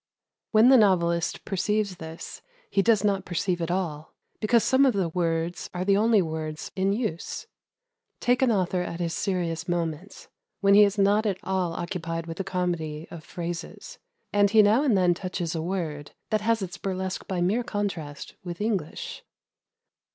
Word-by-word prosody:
When 220 +3 +6
the 265 - +8
novelist 170 -4 +2
perceives 200 0 -1
this 160 -1 -8 0.3
he 195 - +3
does 220 -1 +3
not 200 -2 +1
perceive 175 0 -1
it 165 - -2
all, 165 -4 -3 0.2
because 230 +1 +3
some 260 +1 +4
of 265 -3 +4
the 185 -4 +1
words 165 0 -1
are 180 +1 -2
the 200 0 +4
only 215 -1 +4
words 155 -1 -5
in 195 0 +1
use. 205 -6 -3 0.7
Take 245 +1 +2
an 260 -3 +4
author 185 -3 +1
at 170 -1 -5
his 170 -1 -1
serious 175 -5 -2
moments, 170 +1 -3 0.3
when 200 0 +4
he 210 +1 +9
is 200 +1 -1
not 205 +2 +3
at 195 -3 0
all 185 -3 -1
occupied 165 -1 -4
with 165 0 -7
the 195 - -2
comedy 170 -4 -2
of 165 -2 -9
phrases, 170 0 -6 0.3
and 205 0 +4
he 215 +1 +6
now 215 +5 +4
and 260 -9 +3
then 180 -1 +4
touches 180 -2 -4
a 165 - -2
word 160 -5 -4 0.2
that 215 -1 +2
has 225 -1 +1
its 190 +1 -7
burlesque 190 -1 -3
by 185 -2 -2
mere 200 +8 +1
contrast 180 -10 -4
with 175 -2 -6
English. 205 -7 -3
185 Hz, 175 wpm, -26 LUFS, 170-205 Hz, 0.7 s, he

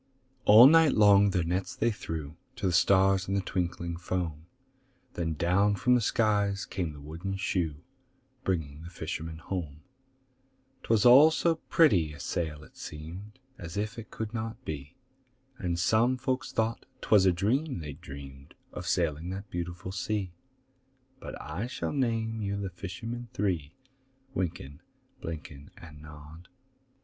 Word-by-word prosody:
All 110 +4 +10
night 160 +1 +7
long 100 -1 +6
their 90 -3 +1
nets 90 +2 -2
they 115 - +1
threw 80 -7 -6 0.2
To 115 - -4
the 95 - +2
stars 95 +1 +4
in 95 - -1
the - - +2
twinkling 85 -2 -3
foam,— 85 -3 -3 0.7
Then 80 -2 -2
down 100 +6 +2
from 125 +5 +2
the 125 - +4
skies 100 -3 +1
came 90 -4 -3
the 75 - -11
wooden 85 +7 -5
shoe, 85 -6 -2 0.6
Bringing 80 -5 -2
the 85 - -9
fishermen 80 -1 -5
home: 80 -3 -5 1.0
'Twas 110 -1 +2
all 135 +6 +9
so 165 +1 +1
pretty 90 - +4
a 75 - -12
sail, 75 -1 -3
it - - -18
seemed 85 +8 -8 0.2
As 85 +2 -7
if 105 +2 -3
it 115 - -10
could 110 0 -5
not 115 0 -5
be; 75 0 -6 0.6
And 85 -2 -1
some 110 +8 +3
folk 130 +1 -1
thought 115 +1 -2
'twas 100 -3 +4
a - - +6
dream 125 - 0
they'd 75 -1 -8
dreamed 70 -4 -11 0.2
Of 90 0 -6
sailing 85 -2 0
that 100 +2 -6
beautiful 90 +2 -5
sea; 95 -1 -2 0.9
But - - -8
I 90 +10 -4
shall 125 - -4
name 115 -4 -1
you 100 0 -2
the 95 -2 -4
fishermen 115 +7 -6
three: 85 - -1 0.6
Wynken, 85 - -4 0.4
Blynken, 75 -3 -7
And 75 -3 -12
Nod. 75 +3 -12
90 Hz, 150 wpm, -29 LUFS, 80-105 Hz, 1.0 s, All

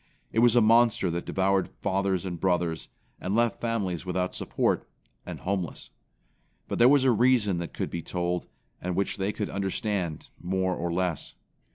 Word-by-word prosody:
It 115 - +1
was 120 0 +5
a 120 - +6
monster 115 -4 +4
that 85 +1 -4
devoured 95 0 +1
fathers 95 -1 0
and 90 -2 -4
brothers, 90 -3 0 0.3
and 95 +3 -2
left 120 0 +1
families 100 -8 -1
without 90 0 -2
support, - - -1 0.4
and - - -6
homeless. 95 -3 -3 0.8
But - - -3
there 120 +2 +7
was 140 -1 +5
a 130 - +5
reason 115 -5 +3
that 85 - -6
could - - -3
be 85 - -3
told, 90 +1 -2 0.3
and 90 0 -2
which 100 +1 -1
they 95 +1 0
could 105 -1 -4
understand 95 -4 -2
more 95 0 0
or 85 0 -2
less. 90 -1 -2
95 Hz, 170 wpm, -27 LUFS, 90-110 Hz, 0.8 s, there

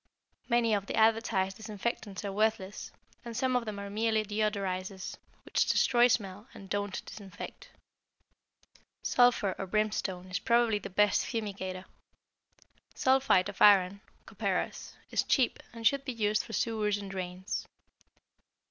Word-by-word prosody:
Many 235 -2 +3
of 200 -1 0
the - - -3
advertised 220 -4 +2
disinfectants 215 -2 -4
are 200 - -2
worthless, 210 -1 -1 0.3
and 235 -2 -6
some 260 -1 +1
of 245 -1 +1
them 215 -2 -5
are 200 0 -5
merely 220 +1 +1
deodorizers, 195 -3 -2 0.3
which - - +1
destroy 240 -1 +4
smell 205 -2 -1
and 195 -1 -12
don't 205 -1 -2
disinfect. 205 -2 -9 1.3
Sulphur 245 -6 +3
or 195 - -3
brimstone 190 -3 -1
is 185 - -1
probably 235 -2 +3
the - - -7
best 210 +1 +3
fumigator. 190 -5 -4 1.1
Sulphite 260 -8 +3
of 205 - -10
iron 200 -1 +6 0.2
(copperas) - - -3 0.2
is - - +2
cheap 260 -4 +1
and 230 -1 -9
should 275 +3 +4
be 260 - -4
used 215 -2 +1
for 225 - -9
sewers 215 -3 0
and 200 -1 -7
drains. 185 0 -4
210 Hz, 135 wpm, -30 LUFS, 195-225 Hz, 1.3 s, iron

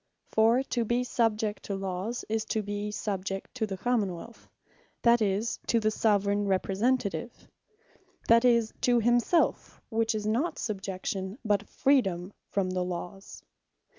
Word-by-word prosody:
For 230 +4 +4
to 240 -3 -1
be 240 +2 +1
subject 220 -3 0
to 200 - -3
Lawes, 195 +4 -3
is 220 0 0
to 220 -1 -1
be 205 +1 -3
subject 195 -2 -4
to 225 -4 -2
the 195 -2 -4
Common 210 -4 0
wealth, 230 +7 -12 0.5
that 235 0 +5
is 210 +2 0
to 230 - +3
the 215 -1 +1
Soveraign 205 -1 +2
Representative, 200 +4 -1 0.8
that 230 +1 +6
is 235 -3 +3
to 245 -1 +4
himselfe; 240 +8 +2
which 225 -1 +1
is 210 -1 -3
not 240 +11 0
subjection, 195 -1 -4
but 205 -1 +1
freedome 195 -10 +1 0.2
from 190 -2 -1
the 185 0 -1
Lawes. 180 +2 -7
215 Hz, 140 wpm, -29 LUFS, 195-235 Hz, 0.8 s, that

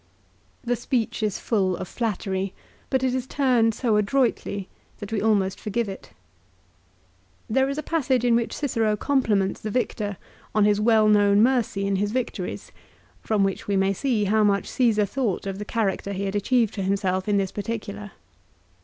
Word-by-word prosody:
The 245 0 0
speech 240 -1 -2
is 210 -2 0
full 190 -5 0
of - - -6
flattery, 195 -4 -2 0.3
but 260 -1 +1
it 255 -1 +1
is 260 0 -2
turned 245 -6 +2
so 225 -3 +1
adroitly 210 -3 0 0.3
that 205 +1 -8
we 220 - 0
almost 200 -3 +1
forgive 215 +2 -2
it. 195 -1 -8 1.4
1 - - -4
There 265 +2 +3
is 275 - -3
a 305 - -3
passage 260 -6 0
in 235 -1 +4
which 235 -1 0
Cicero 225 -7 0
compliments 215 -8 +1
the 215 - -4
victor 210 -3 -2 0.4
on 210 -1 +4
his 210 0 +3
well 220 -1 +4
known 205 0 +5
mercy 235 -6 +1
in 195 -1 +1
his 205 +1 0
victories, 255 -1 -4 0.5
from 215 -3 +1
which 195 -1 -2
we 200 -1 +1
may 195 +1 +2
see 230 0 0
how 215 +2 +3
much 200 -1 +2
Csesar 220 -5 +2
thought 220 -4 -2
of 195 0 -4
the 210 - -5
character 200 -3 -1
he 195 +1 -3
had 195 +1 -3
achieved 225 +1 +2
for 200 - -4
himself 190 0 0
in 205 - +3
this 195 -1 0
particular. 205 -2 -5
210 Hz, 180 wpm, -24 LUFS, 200-240 Hz, 1.4 s, known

